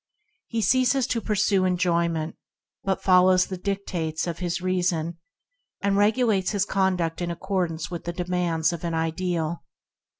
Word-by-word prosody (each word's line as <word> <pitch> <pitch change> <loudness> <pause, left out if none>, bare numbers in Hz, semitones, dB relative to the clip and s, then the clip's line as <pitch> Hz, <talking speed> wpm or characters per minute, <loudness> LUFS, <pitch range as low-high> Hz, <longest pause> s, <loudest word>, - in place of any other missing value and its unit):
He 230 -2 -1
ceases 255 +1 +3
to 230 0 -1
pursue 205 -2 +2
enjoyment, 170 -3 0 0.5
but 190 -1 -1
follows 185 0 +5
the 190 - -5
dictates 180 -5 -2
of 170 -2 -4
his 175 -1 -2
reason, 175 -2 -1 0.6
and 200 0 +1
regulates 210 -2 +2
his 200 -1 +1
conduct 185 -4 0
in 175 - -1
accord 185 +1 -1
ance 160 0 -6
with 175 - -6
the 170 - -3
demands 175 -2 0
of 170 - -6
an 170 -1 -1
ideal. 165 0 -1
180 Hz, 145 wpm, -25 LUFS, 170-195 Hz, 0.6 s, follows